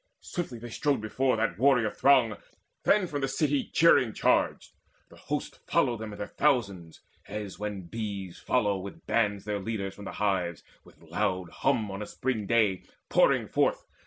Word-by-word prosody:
Swiftly 170 -10 -5
they 120 +1 -9
strode 145 -2 +1
before 125 +3 0
that 110 -5 -1
warrior 125 -4 +4
throng 130 -6 +4 0.5
Then 205 -2 +4
from 145 -5 -4
the 135 - +1
city 140 +1 0
cheering 130 -9 +5
charged. - - +1 0.4
The - - -16
host - - -4
Followed 120 - +2
them 110 -1 -6
in 105 - -8
their 105 - -3
thousands, 100 - 0 0.3
as 105 -1 -6
when 105 -2 -4
bees 100 -1 -5
Follow 105 -6 +1
by - - -16
bands 105 -3 +1
their 105 -1 -2
leaders 100 -2 -3
from 100 - -11
the - - -6
hives, 95 -5 -1 0.2
With - - -20
loud 90 -2 -2
hum 110 -4 0
on 100 +2 -5
a 105 - -5
spring 115 -6 -2
day 105 -5 +2 0.3
pouring - - +3
forth. - - +1
110 Hz, 170 wpm, -28 LUFS, 100-125 Hz, 0.5 s, cheering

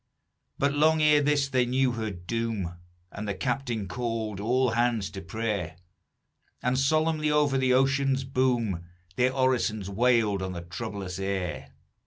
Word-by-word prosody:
"But 140 0 +1
long 155 +2 +3
ere 150 -1 +5
this 145 -1 +2
they 130 -2 +1
knew 130 +1 +2
her 110 -2 -3
doom, 100 -1 -3 0.4
And 105 +1 -6
the 100 - -2
captain 120 -1 -2
called 110 -1 -3
all 125 +4 +2
hands 115 -3 0
to 95 - -7
prayer; 100 -2 -3 0.9
And 125 +1 +1
solemnly 155 +2 +2
over 150 -2 +2
the 130 -1 +3
ocean's 135 0 +2
boom 125 -9 0 0.3
Their 125 +1 +2
orisons 125 -6 0
wailed 110 -2 +2
on 95 0 -3
the 85 - -5
troublous 95 +1 -6
air. 95 -4 -3
120 Hz, 145 wpm, -27 LUFS, 100-135 Hz, 0.9 s, ere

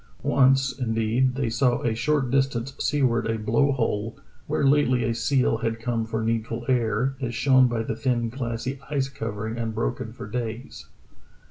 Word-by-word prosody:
Once, 135 0 +4
indeed, 115 +2 +1
they 135 -2 -1
saw 120 +1 +1
a 115 - +1
short 135 +2 0
distance 135 -1 0
seaward 130 -6 +1
a 115 0 0
blow 115 +6 +2
hole, 115 -4 -1 0.3
where - - 0
lately 135 -3 +3
a 115 - 0
seal 115 +1 +1
had 115 0 -2
come 115 -1 -1
for 110 0 -2
needful 115 +1 -2
air, 125 0 +1
as 120 -2 -3
shown 130 0 +5
by 120 -2 -1
the 115 - -3
thin 120 -1 0
glassy 120 +1 -4
ice 135 -2 0
covering, 110 -2 -5
unbroken 110 - -2
for - - -9
days. 115 +2 -5
120 Hz, 160 wpm, -25 LUFS, 115-130 Hz, 0.3 s, shown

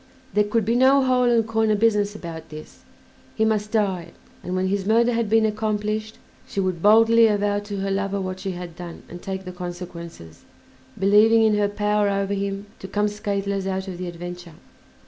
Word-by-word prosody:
There 210 - +4
could 215 0 0
be 230 - +1
no 265 +2 +5
hole 250 -1 +3
and 230 -2 +3
corner 220 -1 +2
business 210 -1 +1
about 165 -4 -8
this; 155 0 -11 0.6
he 220 - +2
must 215 -1 0
die, 190 -6 -1 0.3
and 180 - -3
when 185 0 0
his 195 +1 0
murder 230 +4 +3
had 230 -2 -1
been 220 0 +4
accomplished 215 0 -2 0.3
she - - -4
would 185 -3 -1
boldly 225 +3 +6
avow 205 -1 +1
to 205 0 -6
her 195 0 -2
lover 200 0 -1
what 185 -1 -4
she 190 0 -4
had 175 -2 -8
done 175 -1 -9
and 175 +1 -10
take 190 0 -5
the 180 - -6
consequences, 175 - -9 0.5
believing 215 +3 +5
in 220 -1 +4
her 205 -1 +1
power 210 0 +1
over 200 0 -1
him 200 0 -3
to 190 - -8
come 205 +2 0
scatheless 200 -2 -2
out 190 0 -3
of 180 -2 -6
the 180 - -4
adventure. 175 -1 -8
200 Hz, 190 wpm, -23 LUFS, 185-215 Hz, 0.6 s, boldly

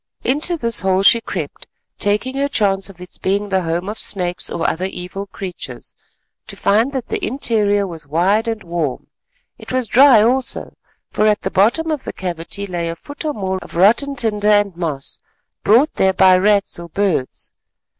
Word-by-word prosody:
Into 305 +6 0
this 235 -5 +1
hole 190 0 +1
she 230 +3 +5
crept, - - -6 0.3
taking 210 +6 0
her 280 +1 +1
chance 195 -6 0
of 185 -3 -14
its 180 0 -8
being 200 +2 -1
the 190 -1 +1
home 170 +2 -2
of 210 +2 -5
snakes 180 -3 +1
or 170 - -2
other 180 +3 -1
evil 190 +1 -5
creatures, 175 -11 -8 0.5
to - - -4
find 220 +7 +2
that 260 -3 -4
the - - -3
interior 210 -5 +1
was 165 -5 -8
wide 190 +9 +1
and 225 -2 -3
warm. 170 -6 -3 0.5
It - - -10
was 255 -2 0
dry 250 -1 +6
also, 255 +3 0 0.4
for 215 - +2
at 210 0 +2
the - - -3
bottom 240 - +2
of 300 -4 -3
the - - -6
cavity 180 +2 -4
lay 175 -3 -3
a 165 - -4
foot 285 - -9
or 305 -1 -1
more 190 -2 -2
of - - -11
rotten 235 +10 +3
tinder 210 -4 0
and 205 -3 +3
moss 155 -6 -4 0.4
brought 250 +9 +4
there 190 0 +2
by 185 0 +5
rats 200 0 +2
or 170 0 -9
birds. 180 -8 -2
200 Hz, 185 wpm, -18 LUFS, 180-230 Hz, 0.5 s, dry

